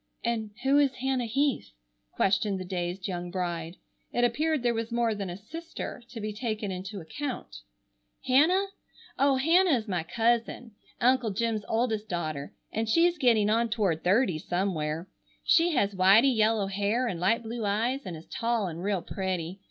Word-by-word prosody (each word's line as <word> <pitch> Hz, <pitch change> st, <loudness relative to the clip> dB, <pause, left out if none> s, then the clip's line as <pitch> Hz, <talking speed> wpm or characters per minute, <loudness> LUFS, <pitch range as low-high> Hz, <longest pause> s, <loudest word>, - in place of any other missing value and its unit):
"And 230 Hz, -2 st, -1 dB
who 275 Hz, +2 st, +4 dB
is 275 Hz, -2 st, +2 dB
Hannah 255 Hz, -2 st, -1 dB
Heath?" 275 Hz, -, 0 dB, 0.4 s
questioned 195 Hz, 0 st, +1 dB
the 185 Hz, -, -5 dB
dazed 180 Hz, +1 st, -3 dB
young 175 Hz, -2 st, -4 dB
bride. 175 Hz, -2 st, -3 dB, 0.4 s
It 240 Hz, -, 0 dB
appeared 300 Hz, +4 st, +1 dB
there 240 Hz, -1 st, +2 dB
was 230 Hz, 0 st, -3 dB
more 235 Hz, -1 st, +1 dB
than 200 Hz, -3 st, -4 dB
a 175 Hz, -, -6 dB
sister 325 Hz, +6 st, -7 dB
to 235 Hz, -, -8 dB
be 215 Hz, 0 st, -4 dB
taken 215 Hz, -2 st, -3 dB
into 190 Hz, +2 st, -6 dB
account. 230 Hz, -, -6 dB, 0.7 s
"Hannah? 320 Hz, +10 st, +4 dB, 0.5 s
Oh, 275 Hz, 0 st, +4 dB
Hannah 325 Hz, +3 st, +4 dB
is 225 Hz, -1 st, -6 dB
my 180 Hz, -4 st, -1 dB
cousin, 230 Hz, +5 st, 0 dB, 0.3 s
Uncle 250 Hz, -1 st, +3 dB
Jim's 220 Hz, +1 st, -1 dB
oldest 220 Hz, -2 st, 0 dB
daughter, 155 Hz, -5 st, -3 dB, 0.2 s
and 220 Hz, 0 st, -2 dB
she's 340 Hz, +6 st, +3 dB
getting 230 Hz, -6 st, +4 dB
on 230 Hz, +1 st, +2 dB
toward 200 Hz, -8 st, 0 dB
thirty 185 Hz, -2 st, +2 dB
somewhere. 170 Hz, -2 st, -2 dB, 0.4 s
She 335 Hz, 0 st, +4 dB
has 205 Hz, -5 st, +2 dB
whitey 200 Hz, +8 st, +5 dB
yellow 220 Hz, -1 st, +3 dB
hair 205 Hz, +5 st, 0 dB
and 180 Hz, -7 st, -3 dB
light 225 Hz, +6 st, +2 dB
blue 230 Hz, +1 st, -5 dB
eyes 230 Hz, +7 st, 0 dB
and 175 Hz, -6 st, -6 dB
is 155 Hz, -, -12 dB
tall 230 Hz, -2 st, -1 dB
and 170 Hz, -2 st, -5 dB
real 195 Hz, -3 st, 0 dB
pretty. 185 Hz, -2 st, -3 dB
220 Hz, 165 wpm, -28 LUFS, 185-245 Hz, 0.7 s, whitey